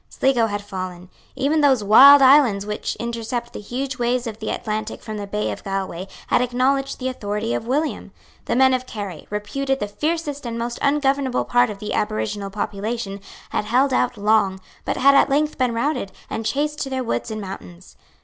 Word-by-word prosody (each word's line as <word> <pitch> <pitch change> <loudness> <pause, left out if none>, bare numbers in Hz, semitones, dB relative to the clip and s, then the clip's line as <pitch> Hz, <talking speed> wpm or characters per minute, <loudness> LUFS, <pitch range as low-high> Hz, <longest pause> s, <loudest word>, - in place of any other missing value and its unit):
Sligo 245 -4 +2
had 205 -1 -4
fallen. 185 -2 -7 0.3
Even 285 +4 +1
those 265 -6 +4
wild 275 +7 +9
islands 260 -7 +5
which 210 0 -3
intercept 235 +1 -4
the - - -6
huge 255 +5 -4
waves 245 +1 0
of 220 -2 -6
the 220 - -4
Atlantic 215 -1 -4
from 215 -2 -6
the 205 -1 -5
bay 210 +1 -2
of - - -7
Galway 195 -2 -4 0.2
had - - +2
acknowledged 265 +3 0
the 255 - -3
authority 215 -2 -3
of 225 - -3
William. 295 +5 -1 0.3
The - - -1
men 260 +1 +5
of 255 0 -1
Kerry, 200 -8 -7
reputed 270 +7 -2
the 205 - -2
fiercest 295 +4 -3
and 230 0 -4
most 235 +1 -4
ungovernable 275 -2 +1
part 245 0 +3
of 210 - -6
the 210 +1 -5
aboriginal 195 - -2
population, 205 +1 -4 0.3
had - - -1
held 260 +5 +2
out 250 - +1
long, 205 -2 +2 0.3
but - - -1
had 275 +2 +6
at 275 - +5
length 295 +2 0
been 250 -2 +1
routed, 235 -5 -1 0.2
and 225 -1 -2
chased 295 +5 -1
to 270 - -3
their 260 -1 -2
woods 235 - -2
and 215 0 -4
mountains. 185 -2 -9
235 Hz, 190 wpm, -22 LUFS, 205-270 Hz, 0.3 s, wild